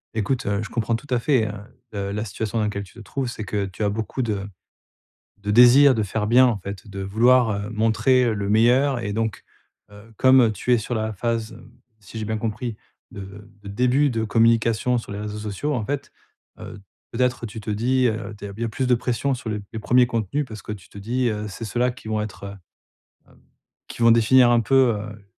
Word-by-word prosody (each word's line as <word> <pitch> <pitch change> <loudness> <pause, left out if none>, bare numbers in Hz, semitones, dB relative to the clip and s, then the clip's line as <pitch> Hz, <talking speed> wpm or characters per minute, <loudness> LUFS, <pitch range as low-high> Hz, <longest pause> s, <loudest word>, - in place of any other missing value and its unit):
Écoute, 115 +4 -1
heu, 100 +1 -1
je 105 - -6
comprends 115 -1 -1
tout 130 +6 -8
à 125 - +2
fait, 120 -2 +2
hein, 105 0 -8 0.3
heu, 100 0 -3
la 105 +2 -3
situation 110 +2 -3
dans - - +1
laquelle 100 -1 -3
tu 95 - -16
te - - -14
trouves, 125 +5 -4
c'est 110 -3 -6
que 100 0 -2
tu 95 +3 -6
as 100 - +2
beaucoup 110 +5 -3
de 105 -4 -2 0.9
de 105 0 -4
désir 125 +4 +7
de 110 - 0
faire 105 +2 -2
bien 125 +2 +6
en 115 -4 +1
fait, 100 0 -8
de 100 -1 -8
vouloir, 115 +4 +3
heu, 100 +1 -3
montrer, 115 +3 +2
heu, 115 - +1
le 100 -1 -3
meilleur. 120 +4 +3
Et 100 -2 -3
donc, 110 -1 -2 0.5
heu, 105 +2 -15
comme 130 -3 +5
tu 125 +4 -1
es 120 - +5
sur 120 +3 -4
la 110 0 -2
phase, 115 +1 -2
hem, 115 +1 -15 0.3
si 105 +2 -14
j'ai 110 - -3
bien 110 0 -2
compris, 110 +1 -4 0.3
de 100 +2 -10
de 100 - -9
début 125 +7 +2
de 115 -2 -2
communication 115 +2 +2
sur 115 - -8
les 100 - -5
réseaux 105 0 -5
sociaux. 110 +8 -3
En 115 -4 -2
fait, 140 +2 -4 0.5
heu, 100 - -9 0.3
peut-être 125 0 0
tu 110 +1 -8
te 105 - -6
dis, 125 +4 +1
heu, 110 -2 -2
t 100 - -8
il - - -10
y - - +1
a - - -1
plus 125 +5 -2
de 125 - +4
pression 125 +3 -1
sur 120 -2 -7
les 105 - -2
p 100 - -11
les 110 - -5
premiers 125 +3 +4
contenus, 115 +5 -2
parce 110 -2 -10
que - - -9
tu 100 -3 -11
te - - -17
dis, 120 +5 -1
heu, 105 -1 -3
c'est 115 +3 -7
ceux-là 120 +3 0
qui 125 -2 -13
vont 110 -1 -1
être, 105 -1 -7
heu 100 0 -7 0.8
hem, - - -23 0.5
qui - - -9
vont 115 0 +6
définir 120 +2 +5
un 120 - +4
peu, 130 -1 +3
heu, 105 0 -9
110 Hz, 235 wpm, -23 LUFS, 105-125 Hz, 0.9 s, désir